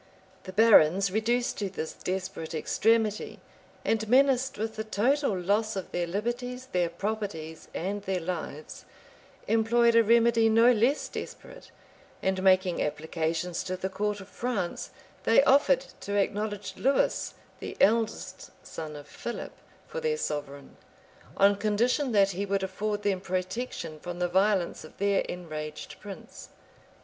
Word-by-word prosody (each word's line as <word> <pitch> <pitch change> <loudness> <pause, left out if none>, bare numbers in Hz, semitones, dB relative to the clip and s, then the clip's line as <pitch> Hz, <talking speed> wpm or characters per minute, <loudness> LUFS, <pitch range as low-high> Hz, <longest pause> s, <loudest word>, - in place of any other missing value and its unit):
The 185 - -6
barons, 195 -3 +6
reduced 235 +4 0
to 200 -2 -1
this 160 -4 -5
desperate 185 -3 -4
extremity, 215 +5 +1 0.5
and 220 -1 0
menaced 265 0 +3
with 220 +1 -3
the 220 - -3
total 220 +2 +1
loss 205 +4 +1
of 190 - -5
their 175 -1 -1
liberties, 245 +6 -3
their 175 -2 +1
properties, 170 -4 -4
and 200 +4 -3
their 190 -2 -2
lives, 165 -3 -6 0.6
employed 230 +1 +3
a 230 - +8
remedy 230 0 +4
no 230 +2 +6
less 245 +5 +2
desperate; - - -9 0.5
and 190 0 0
making 185 -2 +3
applications 160 +3 -2
to 185 0 -3
the 190 +1 -3
court 205 +2 -2
of 190 - -10
France, 225 -6 -3 0.3
they - - +5
offered 275 - +4
to 200 - -4
acknowledge 205 +1 -2
Lewis, 270 +2 +1 0.2
the - - -7
eldest 220 -4 +1 0.2
son 155 -2 -7
of 145 -1 -9
Philip, 235 +10 -6 0.3
for 485 - -5
their 465 -1 0
sovereign, 145 - -5 0.6
on 200 +1 +5
condition 235 +6 +1
that 200 -1 +4
he 195 +2 -3
would 195 0 0
afford 205 +2 -2
them 195 -2 0
protection 185 -2 -4
from 175 +2 -6
the 180 0 0
violence 190 0 +1
of 155 - -14
their 200 0 +2
enraged 155 -4 -6
prince. 200 -2 -10
200 Hz, 140 wpm, -28 LUFS, 180-230 Hz, 0.6 s, a